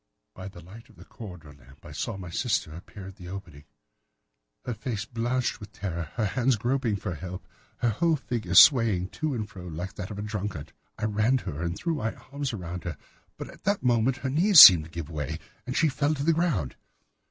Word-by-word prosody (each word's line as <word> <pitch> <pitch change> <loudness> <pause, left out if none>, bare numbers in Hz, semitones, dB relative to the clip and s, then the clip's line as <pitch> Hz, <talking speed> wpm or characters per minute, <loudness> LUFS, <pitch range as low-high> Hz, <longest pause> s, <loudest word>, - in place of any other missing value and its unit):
By 95 0 -9
the 90 -3 -11
light 110 +8 -14
of 110 - -20
the - - -15
corridor 90 -9 -11
lamp 70 0 -20
I - - -10
saw - - -4
my 90 -3 -8
sister 105 -7 -1
appear 95 +3 -11
at 95 - -15
the 90 -3 -11
opening, 90 -7 -9 1.0
her 120 - -2
face 110 -1 -4
blanched 120 +3 -2
with 105 +1 -11
terror, 85 -6 -5
her 110 - 0
hands 125 +5 +1
groping 120 0 -1
for 100 -2 -4
help, 90 +3 -8 0.3
her 120 - +1
whole 165 +9 +1
figure 115 - -4
swaying 110 - +6
to 150 +7 -3
and 110 -3 -3
fro 90 -3 -11
like 85 +3 -6
that 90 - -5
of 105 - -7
a 105 - -4
drunkard. 105 -7 -5 0.2
I 110 - -3
ran 110 +5 +2
to - - -6
her 75 +2 -6
and 85 +1 -3
threw 170 +7 -2
my 115 -7 -3
arms 140 -1 -5
round 90 -5 -6
her, 85 -4 -5 0.4
but - - -7
at - - -18
that 205 0 0
moment 120 +1 +2
her - - +1
knees 180 +5 +6
seemed 85 - +11
to - - -13
give 85 -2 -6
way 75 -2 -4 0.3
and 125 - -3
she 165 - +4
fell 145 +2 0
to 140 - -4
the 165 +2 +3
ground. 155 - -1
105 Hz, 220 wpm, -27 LUFS, 90-125 Hz, 1.0 s, seemed